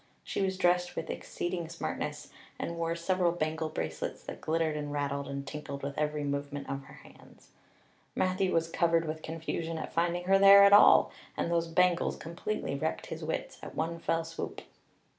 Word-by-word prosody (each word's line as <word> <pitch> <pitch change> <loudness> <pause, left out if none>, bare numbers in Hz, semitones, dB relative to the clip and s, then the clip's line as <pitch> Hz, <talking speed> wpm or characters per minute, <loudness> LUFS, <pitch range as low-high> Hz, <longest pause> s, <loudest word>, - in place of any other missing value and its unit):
She - - -3
was 190 -1 0
dressed 180 -1 +2
with 165 - -3
exceeding 175 -2 -4
smartness - - -4 0.3
and 170 - -4
wore 165 0 -1
several 175 +1 +1
bangle 160 -1 -2
bracelets - - -4
that - - -8
glittered 160 -1 0
and 145 -1 -4
rattled 140 -1 -2
and 140 0 -5
tinkled 140 -1 -6
with 140 0 -4
every 150 0 -1
movement 140 0 -3
of 135 0 -4
her - - -14
hands. - - -19 0.7
Matthew 185 0 +1
was 165 0 +2
covered 165 0 +2
with 155 0 -4
confusion 165 +1 -4
at - - -6
finding 175 +1 0
her 195 +2 +4
there 200 0 +9
at 200 0 +7
all; 205 - +7 0.3
and 170 - -1
those 170 0 +1
bangles 180 +1 +2
completely 170 +1 -4
wrecked 155 +3 -2
his 160 0 -7
wits 160 - -4
at - - -9
one 165 +1 -2
fell 165 0 0
swoop. 165 0 -6
165 Hz, 180 wpm, -30 LUFS, 150-175 Hz, 0.7 s, there